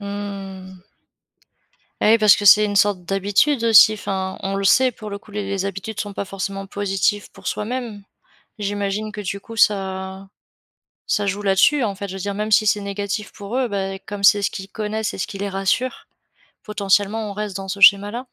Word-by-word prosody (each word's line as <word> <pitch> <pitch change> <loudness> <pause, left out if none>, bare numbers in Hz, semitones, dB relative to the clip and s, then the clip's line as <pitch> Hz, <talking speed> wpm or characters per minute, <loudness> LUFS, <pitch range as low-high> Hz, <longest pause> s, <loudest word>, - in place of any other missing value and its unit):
Mmh. 195 -2 -7 1.2
Ah, 215 - +4
oui 230 - +5
parce 215 -1 +6
que 205 - -4
c'est 210 +1 +8
une 205 -1 -2
sorte 200 -3 +2
d'habitude, 205 +8 +1
aussi, 220 -1 +7
enfin. 190 -2 -4
On 195 0 -2
le 195 - -2
sait, 255 +5 +4
pour 215 -1 -9
le 200 - -5
coup, 205 - -18
les 205 0 -3
les 195 -1 -2
habitudes 200 +2 -5
sont 205 -1 -4
pas 200 - -4
forcément 195 0 -5
positifs 205 +1 -1
pour - - -7
soi-même. 220 -2 -4 0.5
J'imagine 205 +1 -3
que, 210 - -6
du 200 0 -4
coup, 225 +3 -12
ça 190 -2 0 0.8
ça 205 -1 0
joue 200 +1 -2
là-dessus, 205 +8 +3
en 205 -3 -1
fait. 200 +1 -6
Je 190 - -7
veux - - -6
dire, 200 +2 -3
même 210 +2 -3
si 215 +1 +4
c'est 205 0 +2
négatif 200 +1 -4
pour 205 +4 -7
eux, 260 -2 +1
ben, 195 -2 -3
comme 205 -1 -6
c'est 205 0 +6
ce 200 - +1
qu'ils 190 0 -8
connaissent 215 0 -3
et - - -8
ce - - -2
qui 195 - -8
les 200 - -3
rassure. 195 +7 -2 0.6
Potentiellement, 210 +1 0
on 200 - -5
reste 205 -2 -5
dans 195 - -6
ce 200 +1 -5
schéma-là? 205 +4 +5
200 Hz, 205 wpm, -21 LUFS, 195-210 Hz, 1.2 s, c'est